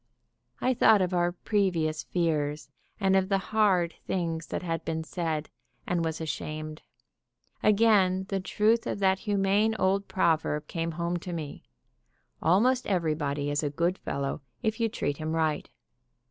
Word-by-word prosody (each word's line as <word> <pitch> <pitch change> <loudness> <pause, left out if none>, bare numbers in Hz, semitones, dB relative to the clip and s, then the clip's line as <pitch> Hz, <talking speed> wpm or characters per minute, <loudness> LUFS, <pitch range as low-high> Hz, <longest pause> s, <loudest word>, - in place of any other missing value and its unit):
I 255 - +2
thought 220 -3 +5
of 180 0 -2
our 175 0 +2
previous 175 -5 0
fears 150 -4 -1 0.3
and 195 -2 +3
of 190 0 +2
the 195 - +3
hard 190 -4 +2
things 165 -3 -2
that - - -4
had 165 -2 -2
been 160 0 -2
said, 160 -2 -3 0.4
and 175 -1 0
was 160 -1 -2
ashamed. 155 -1 -5 0.8
Again 200 -3 +4
the 195 - 0
truth 215 +4 +1
of - - -2
that 190 -1 +2
humane 205 +2 +2
old 195 +1 +1
proverb 160 -4 +1
came 165 -1 -3
home 170 +2 -1
to 175 +1 -6
me: 155 -4 -6 0.8
"Almost 235 +10 +3
everybody 150 -6 0
is 145 - 0
a 150 - -1
good 170 +6 0
fellow 140 +1 -3 0.2
if 220 0 0
you 230 -1 +2
treat 145 -8 -2
him 155 0 -3
right." 160 -2 0
175 Hz, 150 wpm, -28 LUFS, 160-195 Hz, 0.8 s, thought